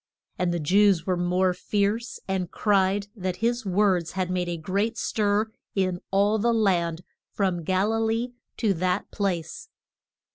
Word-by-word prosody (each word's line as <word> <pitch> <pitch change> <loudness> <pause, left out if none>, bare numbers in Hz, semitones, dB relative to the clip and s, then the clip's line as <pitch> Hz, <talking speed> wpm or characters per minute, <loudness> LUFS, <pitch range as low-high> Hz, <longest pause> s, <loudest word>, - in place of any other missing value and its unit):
And 180 -1 +1
the 175 - -1
Jews 190 +2 +3
were 185 - +1
more 180 +1 +1
fierce, 210 +5 -1
and 190 -2 -1
cried 200 -1 +2
that 185 -3 -3
his 235 +1 -1
words 185 -3 +2
had 185 -1 -2
made 180 -1 -1
a 170 - -2
great 200 +7 -1
stir 210 0 0 0.2
in 185 -2 0
all 205 +3 +2
the 235 +3 +2
land 180 -6 +1 0.3
from 185 -4 -1
Gal 190 +6 +1
i - - +1
lee 225 +2 -1 0.2
to 215 -4 +2
that 185 +2 -1
place. 195 - -3
190 Hz, 155 wpm, -26 LUFS, 180-210 Hz, 0.3 s, Jews